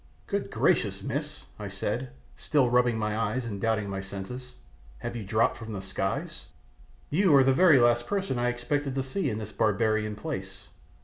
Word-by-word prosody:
"Good -, -, -2 dB
gracious, -, -, +1 dB
miss," -, -, -4 dB, 0.2 s
I -, -, -5 dB
said, 65 Hz, -, -3 dB, 0.3 s
still 130 Hz, -5 st, +2 dB
rubbing 125 Hz, -2 st, +3 dB
my 105 Hz, -1 st, -1 dB
eyes 115 Hz, +3 st, -1 dB
and 100 Hz, -4 st, -5 dB
doubting 110 Hz, -2 st, +1 dB
my 95 Hz, -1 st, -3 dB
senses, 125 Hz, +6 st, -7 dB, 0.4 s
"have -, -, -5 dB
you 115 Hz, -, -4 dB
dropped 110 Hz, +4 st, +1 dB
from 110 Hz, -1 st, -7 dB
the 100 Hz, -, -4 dB
skies? 95 Hz, 0 st, -3 dB, 0.6 s
You 170 Hz, 0 st, +4 dB
are 135 Hz, -, +7 dB
the 135 Hz, 0 st, +4 dB
very 165 Hz, -2 st, +6 dB
last 120 Hz, 0 st, +3 dB
person 195 Hz, -11 st, -1 dB
I 120 Hz, 0 st, +2 dB
expected 135 Hz, +3 st, -2 dB
to 135 Hz, -, 0 dB
see 140 Hz, +4 st, -1 dB
in 105 Hz, -, -2 dB
this 110 Hz, -1 st, -6 dB
barbarian 110 Hz, 0 st, +1 dB
place." 100 Hz, -8 st, -6 dB
120 Hz, 180 wpm, -28 LUFS, 105-130 Hz, 0.6 s, are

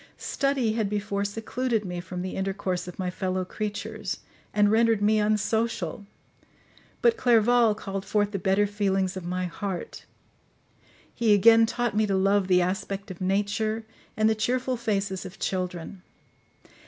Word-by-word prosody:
Study 275 Hz, -5 st, 0 dB
had 220 Hz, -3 st, 0 dB
before 205 Hz, -1 st, -2 dB
secluded 225 Hz, +2 st, -2 dB
me 180 Hz, -1 st, -4 dB
from 180 Hz, 0 st, -5 dB
the 185 Hz, -, -4 dB
intercourse 190 Hz, -2 st, -2 dB
of 180 Hz, -, -8 dB
my 185 Hz, -1 st, -2 dB
fellow 185 Hz, 0 st, -2 dB
creatures, 210 Hz, 0 st, -4 dB, 0.3 s
and 205 Hz, 0 st, +3 dB
rendered 225 Hz, -1 st, +4 dB
me 215 Hz, +1 st, +3 dB
unsocial; 210 Hz, -3 st, 0 dB, 1.0 s
but 470 Hz, -1 st, +4 dB
Clerval 235 Hz, -2 st, +4 dB
called 195 Hz, -2 st, -5 dB
forth 205 Hz, 0 st, 0 dB
the 200 Hz, -, -2 dB
better 195 Hz, +3 st, +2 dB
feelings 195 Hz, -2 st, 0 dB
of 185 Hz, -2 st, -6 dB
my 180 Hz, +1 st, -1 dB
heart; 180 Hz, +1 st, -5 dB, 1.1 s
he 220 Hz, -3 st, +4 dB
again 225 Hz, +2 st, +6 dB
taught 240 Hz, -2 st, -1 dB
me 215 Hz, 0 st, +2 dB
to 195 Hz, -, +1 dB
love 195 Hz, 0 st, +2 dB
the 180 Hz, -1 st, +4 dB
aspect 195 Hz, +2 st, -3 dB
of 185 Hz, -, -10 dB
nature, 205 Hz, +3 st, 0 dB, 0.3 s
and 215 Hz, 0 st, +4 dB
the 220 Hz, -, +4 dB
cheerful 250 Hz, +4 st, 0 dB
faces 200 Hz, -5 st, -2 dB
of 185 Hz, 0 st, -9 dB
children. 180 Hz, 0 st, -3 dB
205 Hz, 150 wpm, -26 LUFS, 190-220 Hz, 1.1 s, again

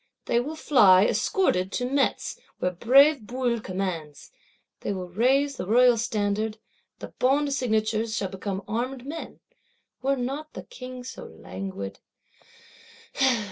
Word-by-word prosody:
They 235 Hz, -, +2 dB
will 295 Hz, +6 st, -4 dB
fly, 205 Hz, -11 st, +6 dB
escorted, 190 Hz, -, +1 dB
to 245 Hz, -, -1 dB
Metz, 275 Hz, +2 st, 0 dB, 0.2 s
where 180 Hz, -, 0 dB
brave 275 Hz, -, +5 dB
Bouillé 240 Hz, -2 st, -1 dB
commands; 180 Hz, -6 st, -5 dB, 0.5 s
they -, -, -3 dB
will 185 Hz, -2 st, -5 dB
raise 265 Hz, +8 st, +2 dB
the 180 Hz, -, -5 dB
Royal 245 Hz, +3 st, +5 dB
Standard: 215 Hz, -1 st, -1 dB, 0.4 s
the -, -, -8 dB
Bond 280 Hz, +2 st, +2 dB
signatures 220 Hz, -3 st, 0 dB
shall 195 Hz, -, -2 dB
become 190 Hz, +1 st, -5 dB
armed 245 Hz, +4 st, -3 dB
men. 320 Hz, +3 st, -7 dB, 0.6 s
Were 275 Hz, +1 st, +1 dB
not 275 Hz, +5 st, -4 dB
the -, -, -7 dB
King 255 Hz, -1 st, -9 dB
so 255 Hz, -, -8 dB
languid! 95 Hz, +3 st, -7 dB
235 Hz, 130 wpm, -26 LUFS, 190-265 Hz, 0.6 s, fly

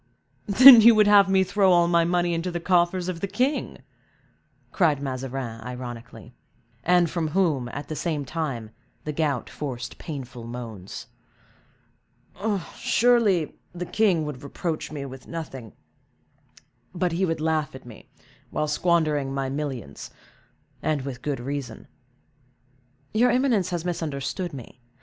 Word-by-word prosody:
"Then, 245 Hz, +4 st, +10 dB
you 230 Hz, +1 st, +8 dB
would 215 Hz, -1 st, +5 dB
have 200 Hz, -1 st, +6 dB
me 190 Hz, 0 st, +4 dB
throw 195 Hz, 0 st, +2 dB
all 175 Hz, -1 st, +5 dB
my 170 Hz, -1 st, +3 dB
money 175 Hz, 0 st, +1 dB
into 165 Hz, +2 st, -2 dB
the 175 Hz, -1 st, -3 dB
coffers 175 Hz, 0 st, +1 dB
of 180 Hz, -2 st, -3 dB
the 200 Hz, -, -2 dB
king!" 255 Hz, +9 st, -2 dB, 0.9 s
cried 155 Hz, -7 st, +2 dB
Mazarin, 130 Hz, -4 st, -5 dB
ironically; 125 Hz, -1 st, -8 dB, 0.5 s
and 175 Hz, 0 st, +4 dB
from 165 Hz, 0 st, -2 dB
whom, 155 Hz, -7 st, 0 dB
at 145 Hz, +4 st, -7 dB
the 155 Hz, -, -5 dB
same 150 Hz, -3 st, -2 dB
time 130 Hz, -7 st, -4 dB, 0.3 s
the 150 Hz, -, -4 dB
gout 145 Hz, -5 st, -1 dB
forced 125 Hz, -5 st, -6 dB
painful 130 Hz, -6 st, -7 dB
moans. 115 Hz, -6 st, -8 dB, 1.7 s
"Surely 225 Hz, -9 st, +2 dB
the 180 Hz, 0 st, -5 dB
king 185 Hz, -5 st, +1 dB
would 145 Hz, -4 st, -6 dB
reproach 155 Hz, +3 st, -4 dB
me 145 Hz, -2 st, -5 dB
with 130 Hz, -1 st, -10 dB
nothing, 135 Hz, -, -7 dB, 1.2 s
but 180 Hz, 0 st, 0 dB
he 170 Hz, +3 st, -1 dB
would 165 Hz, -3 st, 0 dB
laugh 155 Hz, -3 st, -1 dB
at 130 Hz, -, -11 dB
me, 120 Hz, -3 st, -13 dB, 0.4 s
while 150 Hz, -, -1 dB
squandering 150 Hz, -3 st, +1 dB
my 135 Hz, -1 st, -2 dB
millions, 135 Hz, -, -5 dB, 0.7 s
and 150 Hz, -3 st, -1 dB
with 130 Hz, -2 st, -6 dB
good 145 Hz, -2 st, -3 dB
reason." 130 Hz, -2 st, -6 dB, 1.3 s
"Your 240 Hz, +3 st, +4 dB
eminence 245 Hz, -7 st, +2 dB
has 175 Hz, -1 st, -3 dB
misunderstood 160 Hz, 0 st, -3 dB
me. 130 Hz, -2 st, -11 dB
155 Hz, 135 wpm, -25 LUFS, 135-180 Hz, 1.7 s, Then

